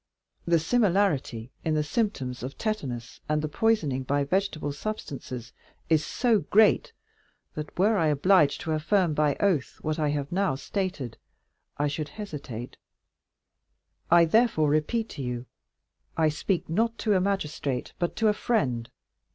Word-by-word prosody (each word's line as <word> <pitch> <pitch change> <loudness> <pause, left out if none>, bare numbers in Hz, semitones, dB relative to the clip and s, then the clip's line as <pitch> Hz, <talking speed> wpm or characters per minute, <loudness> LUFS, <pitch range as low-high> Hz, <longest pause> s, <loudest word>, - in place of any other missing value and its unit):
The 170 0 +5
similarity 170 - +1
in 160 -1 +1
the 150 - +2
symptoms 145 - -2
of 130 +3 -6
tetanus 135 - -4
and 150 0 0
poisoning 165 -13 +1
by 140 +2 0
vegetable 160 -2 -1
substances 140 - -6 0.4
is 160 -2 +4
so 235 - +2
great, 220 - +4 0.6
that 150 0 -7
were 210 +4 +3
I 160 - +3
obliged 150 +1 +4
to 160 - -3
affirm 170 +2 +2
by 150 -1 +2
oath 180 -10 0
what 155 +1 -1
I 150 -1 +1
have 145 -1 -2
now 190 -5 +1
stated, 150 - -4 0.6
I 145 - +1
should 150 +1 -3
hesitate; 140 - -7 1.3
I 170 0 +7
therefore 165 -5 +3
repeat 185 +10 +1
to - - -7
you, 125 -1 -4 0.7
I 160 -1 +4
speak 165 +4 -1
not 225 +7 0
to 215 - +1
a 185 - +3
magistrate, 150 -9 -2
but 175 -1 -1
to 225 - +2
a 210 - +4
friend. 125 - 0
155 Hz, 145 wpm, -27 LUFS, 140-200 Hz, 1.3 s, I